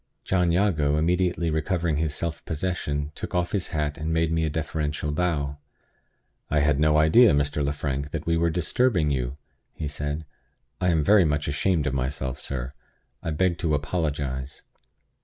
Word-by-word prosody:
John 90 -2 +2
Jago, 80 -6 +2
immediately 85 +1 +1
recovering 80 0 0
his 75 -1 -1
self 85 -2 -4
possession, 75 -3 -2
took - - -6
off 90 0 0
his 100 -4 -1
hat, 75 0 -2
and 80 +1 -2
made 80 0 +1
me 80 0 +1
a 80 - +1
deferential 75 -1 -2
bow. 75 -4 -1 0.9
"I 75 -1 +2
had 75 -1 +2
no 75 0 +4
idea, 90 +10 +6
Mr. 75 0 0
Lefrank, 70 0 -2
that - - -4
we 85 - +2
were 85 0 +2
disturbing 90 - +1
you," 65 0 -2 0.4
he 75 - -4
said. 75 +2 -4 0.6
"I 90 - +3
am 80 -3 +2
very 100 +3 +6
much 75 -2 0
ashamed 75 +2 +1
of 75 - -1
myself, 65 0 -2
sir. 65 -2 -5 0.5
I - - -3
beg 85 +2 +1
to 80 -3 +1
apologize." 70 -3 -3
75 Hz, 165 wpm, -25 LUFS, 75-85 Hz, 0.9 s, idea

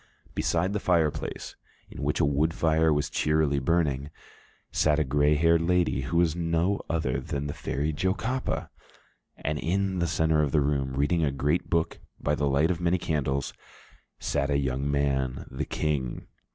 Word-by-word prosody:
Beside 90 +4 0
the 105 - 0
fireplace, 85 -6 0 0.4
in - - -8
which - - 0
a - - +4
wood 75 +3 +1
fire 80 0 +3
was 75 -1 +1
cheerily 75 -2 +1
burning, 70 -2 0 0.6
sat 75 -1 +2
a 80 - +3
gray 75 +2 +2
haired 80 +2 +4
lady, 85 -4 +1
who 75 +6 -2
was 85 -2 +3
no 85 +3 0
other 75 -6 0
than 70 0 -4
the 70 - -3
Fairy 75 +3 -2
Jocapa, 100 - -1 0.7
and 75 0 -2
in 95 +2 0
the 85 - +1
centre 80 -1 +2
of 75 -3 -1
the 75 - +4
room, 70 -2 0
reading 75 +5 +1
a 75 - +2
great 75 +6 0
book 85 -1 0 0.2
by 75 - 0
the 75 -1 0
light 75 +5 +3
of 90 -1 -3
many 85 +1 +2
candles, 70 -5 -1 0.6
sat 70 0 -1
a 70 - +2
young 70 0 -1
man, 70 -2 0
the 70 +4 -3
King. 70 -5 -2
75 Hz, 170 wpm, -27 LUFS, 70-85 Hz, 0.7 s, a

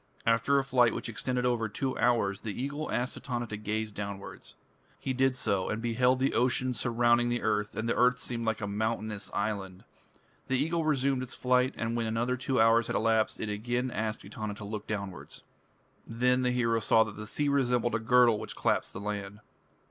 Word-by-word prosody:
After 115 +4 +3
a 135 - +2
flight 125 -4 +3
which - - -4
extended 125 +2 -2
over 120 -3 +1
two 130 +5 -2
hours, 105 -5 +2
the 110 0 -5
Eagle 140 +4 -3
asked 125 +1 -1
Etana 120 -2 -3
to 110 - -6
gaze 105 +1 -3
downwards. 100 -1 -7 0.4
He 130 - -3
did 130 0 +2
so, 100 -6 0
and 105 - -2
beheld 125 +2 +2
the 130 +1 +1
ocean 125 +1 +2
surrounding 120 0 +2
the 120 0 -1
earth, 105 0 0
and 110 +1 -2
the - - +2
earth 125 0 +4
seemed 120 -2 -4
like 110 -1 -1
a 100 - -2
mountainous 110 0 -2
island. 100 -3 -3 0.6
The 130 - +1
Eagle 165 +4 0
resumed 135 -3 +1
its 130 - -6
flight, 125 +1 +2
and 115 +1 -2
when 115 -1 -1
another 115 +3 0
two 130 0 -1
hours 115 +1 +5
had - - -2
elapsed, 110 0 +1
it 110 - -3
again 120 +4 -2
asked 110 -2 -3
Etana 105 +1 -5
to 105 - -9
look 105 0 -6
downwards. 100 -4 -6 0.6
Then 125 +2 +2
the 125 - +1
hero 115 -2 +1
saw 110 0 +4
that 105 -2 -8
the 110 0 -7
sea 145 +6 0
resembled 125 -4 +1
a 110 - +1
girdle 120 -1 +4
which - - -7
clasped - - 0
the - - -6
land. 100 0 -4
115 Hz, 200 wpm, -29 LUFS, 110-125 Hz, 0.6 s, hours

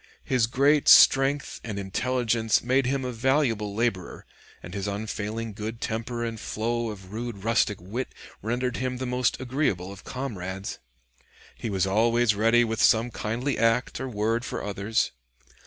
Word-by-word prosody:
His 125 -4 +2
great 140 +4 +3
strength 135 +1 +6
and 105 -3 -5
intelligence 115 +3 0
made 130 +1 +2
him 135 0 -1
a 125 - -2
valuable 115 -4 +1
laborer, 110 -6 -2 0.4
and 85 - -9
his 100 0 -3
unfailing 110 +2 -4
good 110 +2 -5
temper 120 +1 -3
and 115 -1 -4
flow 115 +2 -2
of 95 -2 -9
rude 115 -3 -5
rustic 110 -2 +1
wit 110 +9 -5 0.3
rendered 125 +3 -1
him 130 0 -2
the 130 - -4
most 125 -1 0
agreeable 125 - -1
of 100 - -11
comrades. 100 -7 -5 0.8
He 115 - -5
was 95 -2 +1
always 115 +3 +3
ready 115 +3 +4
with 110 -1 -1
some 115 +2 +4
kindly 120 +6 -2
act 115 +3 +1
or 130 +1 -4
word 115 +1 0
for - - -4
others. 100 +2 -1
115 Hz, 155 wpm, -26 LUFS, 105-125 Hz, 0.8 s, strength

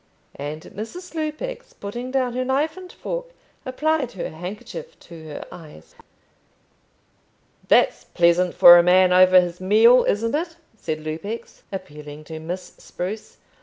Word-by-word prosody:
And 150 +2 -6
Mrs. 340 - -9
Lupex, 315 +11 -5
putting 240 +5 -6
down 255 -2 0
her 255 +1 -1
knife 280 +5 0
and 370 -1 -11
fork, - - -5 0.4
applied 290 0 -1
her 190 - -5
handkerchief 210 - -8
to 165 -2 -12
her 150 -2 -8
eyes. 150 - -13 1.7
"That's - - +3
pleasant 175 +1 +2
for 175 0 +9
a - - +7
man 180 +1 +4
over 185 0 +7
his 180 0 -3
meals, 225 +6 +5
isn't 230 +4 0
it?" 330 +2 -2 0.2
said 155 -7 -5
Lupex, 165 +9 -6
appealing 150 -5 -8
to 160 +1 -8
Miss 175 +4 -7
Spruce. 205 +5 -7
195 Hz, 135 wpm, -22 LUFS, 170-265 Hz, 1.7 s, for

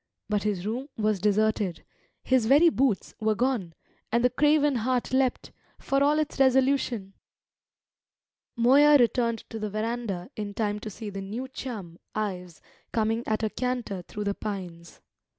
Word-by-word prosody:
But 210 -1 +1
his 200 -3 -2
room 250 +7 -3
was 215 -2 +1
deserted; 210 -2 +1 0.4
his 255 -4 +2
very 295 +7 +6
boots 260 - 0
were 215 -1 +1
gone; 230 -9 -1 0.4
and 235 +1 +2
the 250 - +4
craven 295 0 +3
heart 250 +2 -1
leapt, 260 -1 +1 0.3
for 275 0 0
all 295 +1 +3
its 310 -2 -2
resolution. 260 -6 +2 1.4
Moya 280 +5 +6
returned 235 -2 +1
to 225 - -5
the 215 0 -3
verandah 215 -1 -3
in 205 -1 -5
time 210 -1 -1
to 215 - -6
see 210 +1 -7
the 195 0 -5
new 220 +7 -5
chum, 215 -10 -7 0.2
Ives, 180 -5 -4 0.3
coming 225 0 0
at 215 +1 0
a 215 - 0
canter 245 -6 -3
through 210 +4 -6
the 200 0 0
pines. 180 -6 -7
220 Hz, 150 wpm, -27 LUFS, 205-255 Hz, 1.4 s, very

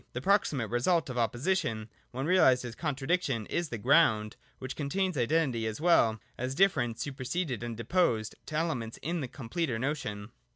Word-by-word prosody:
The 120 - -3
proximate 145 - +1
result 140 +5 +1
of 125 - -3
opposition 120 - 0 0.2
(when 130 +3 -4
realised 140 -8 +4
as 120 - -6
con 135 - -2
tradiction) 135 -5 -1
is 170 -2 -1
the 115 - -4
Ground, 110 -4 +3 0.2
which 130 0 -6
contains 185 +5 -1
identity 130 -3 +1
as 110 -1 -4
well 135 -10 +4 0.2
as 130 +2 -2
difference 130 -11 +2
superseded 135 - -3
and 120 -2 -5
deposed 115 - +1
to 155 - -5
elements 140 -9 -2
in 170 +2 -2
the 130 - -3
com 120 -1 -10
pleter 150 -5 -1
notion. 115 -6 -3
130 Hz, 170 wpm, -30 LUFS, 115-165 Hz, 0.2 s, realised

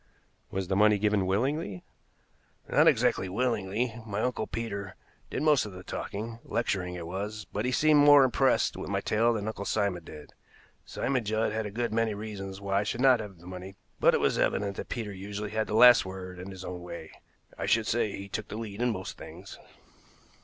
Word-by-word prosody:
"Was 95 -1 -3
the 95 - 0
money 105 +1 +5
given 105 -2 +1
willingly?" 105 - -1 0.8
"Not - - +4
exactly 95 - +3
willingly. 110 +1 -1
My 105 -1 -3
Uncle 125 -3 -1
Peter 100 -4 -5 0.3
did - - -3
most 150 -7 +4
of 100 - -9
the 90 0 -9
talking 115 +5 -5
lecturing 95 -6 -2
it 85 -2 -6
was 105 +5 -5
but 105 +3 -1
he 125 - +1
seemed 150 +4 +4
more 145 -1 +8
impressed 130 -3 +2
with - - -6
my - - 0
tale 115 +2 +2
than 110 -3 -2
Uncle 110 -2 -4
Simon 100 -4 -1
did. 75 -2 -12 0.5
Simon 130 -2 -1
Judd 110 +1 0
had 110 0 -2
a - - -5
good 115 +2 -2
many 115 -2 +1
reasons 100 -2 -6
why 100 0 0
I - - 0
should 115 +3 -3
not 130 -2 +6
have 105 -4 -7
the 85 - -17
money, 95 +1 -8 0.2
but - - +5
it - - +2
was - - +1
evident 100 -1 0
that - - -6
Peter 110 -4 -4
usually 100 +2 -6
had 110 0 -1
the 105 - -2
last 120 +1 +8
word 95 -1 -8
and 90 +2 -7
his 95 -1 -9
own 90 0 -6
way. 85 -2 -8 0.4
I - - -4
should 115 -1 +3
say 110 -2 0
he 100 0 -7
took 110 +2 -5
the 105 - -6
lead 110 -1 -6
in 125 - +2
most 95 -5 -5
things." - - -10
105 Hz, 205 wpm, -29 LUFS, 95-115 Hz, 0.8 s, more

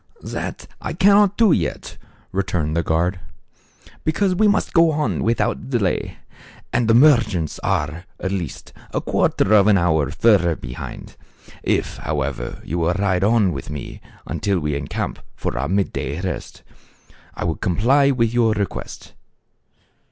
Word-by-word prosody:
" - - -26 0.2
That - - -6 0.2
I - - -4
cannot 200 0 +4
do 225 -5 +5
yet," - - -2 0.3
returned 90 -5 -1
the 85 - +2
guard, 85 +3 0 0.8
"because 185 +5 +1
we 210 +4 +3
must 205 +1 +1
go 165 -1 +5
on 150 0 -1
without 115 +3 0
delay, 115 -8 -1 0.6
and 120 -2 +2
the 115 - +4
merchants 115 - +3
are, 80 +4 -2
at 95 - -3
least, 90 -7 -5 0.2
a - - +2
quarter 105 - +1
of 105 -1 +6
an 105 -2 +5
hour 80 -5 +2
fur 105 +6 +4
ther 85 -2 0
behind. - - -8 0.5
If, - - -1
however, 70 -5 -3
you 85 +4 -2
will 85 +1 +1
ride 95 -2 +1
on 105 -3 +3
with 70 -4 -6
me 75 -3 -7 0.2
until 100 -3 -1
we 75 -2 -2
encamp 70 0 -3 0.2
for - - -3
our 70 - -2
mid 100 +1 0
day 70 +5 -3
rest, 95 0 -5 0.7
I - - -4
will 80 -2 -1
comply 130 +10 +3
with 115 -4 +1
your 115 -2 +3
request." 100 -2 -5
95 Hz, 155 wpm, -21 LUFS, 80-120 Hz, 0.8 s, of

